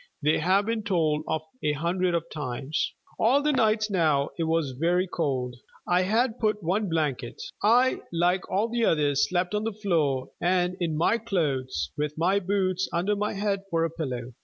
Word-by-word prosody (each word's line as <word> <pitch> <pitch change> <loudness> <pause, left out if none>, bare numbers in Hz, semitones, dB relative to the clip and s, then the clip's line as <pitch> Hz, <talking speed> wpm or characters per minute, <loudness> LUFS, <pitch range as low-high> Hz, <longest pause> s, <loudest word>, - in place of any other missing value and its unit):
They 150 +2 +3
have 190 +5 +2
been 225 0 -1
told 160 -7 +1
of 160 -1 -1 0.2
a 150 0 +1
hundred 175 +4 0
of 165 - 0
times. 145 0 -2 0.3
All 265 +6 +4
the 300 - +3
nights 215 -4 +2
now 155 -6 +2
it 165 - +1
was 160 -4 0
very 170 +7 +1
cold. 130 -8 -2 0.3
I 180 +1 +3
had 225 +5 +1
but 215 -2 0
one 195 +4 0
blanket. 150 -7 -2 0.2
I, 245 +5 +4
like 175 +2 +1
all 200 +4 +1
the 235 0 -1
others, 145 -6 +2
slept 180 +1 0
on 210 0 0
the 225 - -1
floor, 160 -11 0
and 180 0 +1
in 165 -3 -1
my 205 +8 +2
clothes, 155 - -1
with 150 0 -2
my 185 +5 +2
boots 190 -1 0
under 185 +5 0
my 210 +1 -1
head 200 -1 -1
for 165 -2 +1
a 165 - -3
pillow. 125 -7 -5
175 Hz, 185 wpm, -26 LUFS, 150-205 Hz, 0.3 s, All